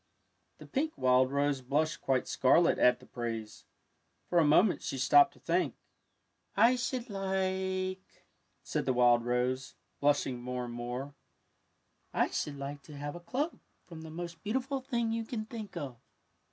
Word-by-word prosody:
The - - -12
pink 310 +3 -1
wild 130 0 +4
rose 140 -1 +1
blushed 150 +5 0
quite 130 -2 +1
scarlet 165 +6 +4
at 125 0 +5
the 125 - -16
praise. 115 -3 -5 0.6
For 175 - +2
a - - +5
moment 175 +7 +4
she 135 - -4
stopped 355 - +6
to - - -20
think. - - 0 0.4
'' - - -37
I 250 - +3
should 250 0 -2
like," 190 -1 -2 0.4
said - - -2
the 130 - +3
wild 120 -1 +5
rose, 125 +2 -1 0.2
blush 145 0 +3
ing 125 -2 -4
more 125 0 -3
and 120 - -7
more, 125 +4 -5 0.5
'' - - -44
I - - +2
should 145 -1 -3
like 140 +1 -6
to 150 -2 -10
have 145 +1 -4
a - - -7
cloak 265 - -2 0.3
from 165 -2 -10
the 160 - -8
most 170 +1 -7
beautiful 265 +5 -2
thing 235 -3 -1
you 230 0 -1
can 220 -1 -4
think 215 -5 -7
of.'' 135 -7 -5
150 Hz, 170 wpm, -31 LUFS, 130-195 Hz, 0.6 s, stopped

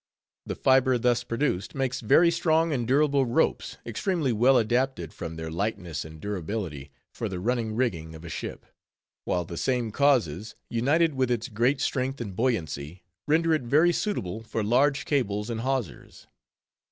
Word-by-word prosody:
The - - -3
fiber 130 -1 +4
thus 120 0 +1
produced 115 -5 -2
makes 135 -2 -1
very 170 +10 +5
strong 165 -1 +2
and 120 -4 -1
durable 140 0 +3
ropes, 120 - 0
extremely 140 - -1
well 125 +4 +5
adapted, 120 - 0
from 80 -1 -6
their 80 0 -6
lightness 90 -5 -3
and 80 0 -11
durability, 90 -6 -4 0.2
for - - -4
the 90 - -4
running 115 +1 -1
rigging 85 -10 -1
of 80 +1 -11
a - - -7
ship; - - -6 0.6
while 90 -1 0
the 85 0 -7
same 125 -1 0
causes, 110 - +1 0.2
united 145 +7 +2
with 130 -2 0
its 120 +1 -1
great 120 +5 +1
strength 135 0 -1
and 100 -6 -5
buoyancy, 85 - -2 0.2
render 160 +2 +3
it 155 - +1
very 150 +8 +3
suitable 110 - -2
for 110 0 -3
large 135 +6 +2
cables 105 -6 -1
and 115 -1 -3
hawsers. 130 - -4
120 Hz, 160 wpm, -27 LUFS, 95-135 Hz, 0.6 s, very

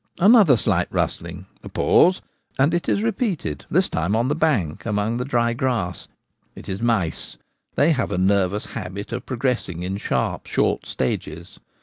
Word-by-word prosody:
Another 195 - +6
slight - - 0
rustling 85 +2 -3
— - - -35
a - - -8
pause, 180 +2 +3 0.3
and 140 +5 +3
it 175 - -1
is 205 - +1
repeated; 195 - -2
this - - +2
time 85 +6 -1
on 120 +3 +1
the 150 - +1
bank, 125 - 0
among 105 +1 -1
the 125 - -2
dry 120 -3 +1
grass. 115 - -2 0.5
It - - -11
is 95 +1 -4
mice; 110 -9 -1 0.4
they 155 +4 +4
have 130 -6 -1
a - - -1
nervous 100 +1 +1
habit 100 +4 -6
of 120 - -5
pro 130 - -4
gressing 115 -9 -2
in 95 +2 -3
sharp, - - -2
short - - 0
stages. 80 +6 -4
115 Hz, 175 wpm, -22 LUFS, 90-140 Hz, 0.5 s, Another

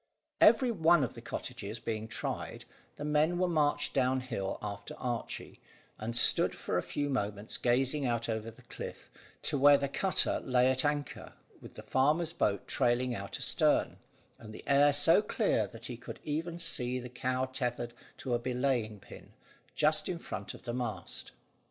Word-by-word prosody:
Every 255 -3 +6
one 170 -6 +4
of 125 - -2
the - - -10
cottages 105 +3 -6
being 110 -1 -4
tried, 115 - -5 0.3
the 145 - -6
men 150 +3 +2
were 180 0 +2
marched 150 -4 +1
down 130 -1 +2
hill 115 -7 -3
after 100 -1 -6
Archy, 120 -2 -5 0.4
and 115 +2 -3
stood - - +4
for - - -4
a - - +2
few 145 - -3
moments 105 -5 -2
gazing 130 +4 +2
out 115 -1 -1
over 110 0 -3
the 115 - -16
cliff, - - -9 0.3
to 145 - +1
where 145 +1 +8
the 140 0 -1
cutter 190 +7 +1
lay 125 0 +3
at 130 0 0
anchor, 145 -1 -2 0.3
with - - -12
the - - -9
farmer's 155 +5 +1
boat 100 - 0
trailing 120 +1 +1
out 100 -3 -5
astern, - - +2 0.4
and 110 -1 -10
the - - -10
air 140 +1 +5
so 145 +7 +5
clear 210 - +1
that 115 0 -12
he 120 -2 -6
could 120 - -9
even 165 +3 -3
see 125 -7 0
the 125 -1 -6
cow 130 +1 -1
tethered 120 -2 -3 0.2
to 125 - -3
a 120 - +2
belaying 125 -4 -1
pin, - - -14 0.4
just - - +2
in - - -2
front - - -6
of - - -14
the 120 - -4
mast. 120 -3 -4
130 Hz, 175 wpm, -31 LUFS, 115-145 Hz, 0.4 s, where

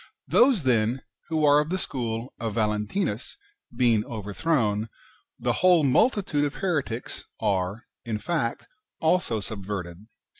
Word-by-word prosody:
Those, 245 - +4
then, 120 0 +1 0.2
who 160 -2 +1
are 145 0 +6
of 150 +1 -1
the 185 - 0
school 120 -7 -4
of 115 -2 -3
Valentinus 105 - -1 0.3
being 120 -3 +2
overthrown, 110 0 -1 0.5
the - - 0
whole 180 -3 +6
multitude 155 - +2
of 145 -1 -1
heretics 145 -11 -2
are, 100 +1 -1 0.2
in 110 -2 -2
fact, 130 -2 -2 0.3
also 160 -9 +2
subverted. 100 -2 -6
120 Hz, 120 wpm, -26 LUFS, 105-160 Hz, 0.5 s, are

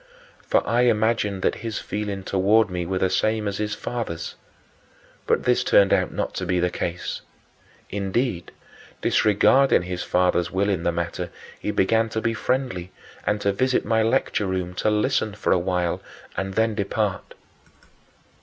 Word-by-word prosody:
For - - +2
I 120 +1 +3
imagined 110 -4 +1
that - - +2
his 115 -2 -3
feelings 100 -2 -4
toward 100 +2 +3
me 90 -1 -3
were 95 +1 -1
the 95 - +2
same 110 -1 +1
as 100 0 -3
his 105 -1 -1
father's. 115 -8 -4 0.9
But - - +2
this 125 0 +2
turned 100 -1 +5
out - - +2
not - - -3
to 95 - -2
be 90 -1 +1
the 90 0 +1
case. 90 0 -4 0.7
Indeed, 100 0 -1 0.5
disregarding 110 +3 +4
his 90 0 -4
father's 90 -1 +1
will 100 +2 0
in 95 -4 0
the 85 - +1
matter, 85 +1 -3 0.3
he - - -4
began 110 +3 +2
to 110 - -2
be 115 +1 0
friendly 115 -7 -2 0.4
and 105 0 +1
to 100 - +1
visit 130 +5 +1
my 110 +1 +2
lecture 110 -3 +1
room, 90 -1 -2
to 100 - 0
listen 105 -1 +1
for - - -1
a 90 - +4
while 90 -1 -1 0.3
and 95 0 -3
then 110 0 +2
depart. 105 -1 -2
100 Hz, 165 wpm, -24 LUFS, 90-110 Hz, 0.9 s, turned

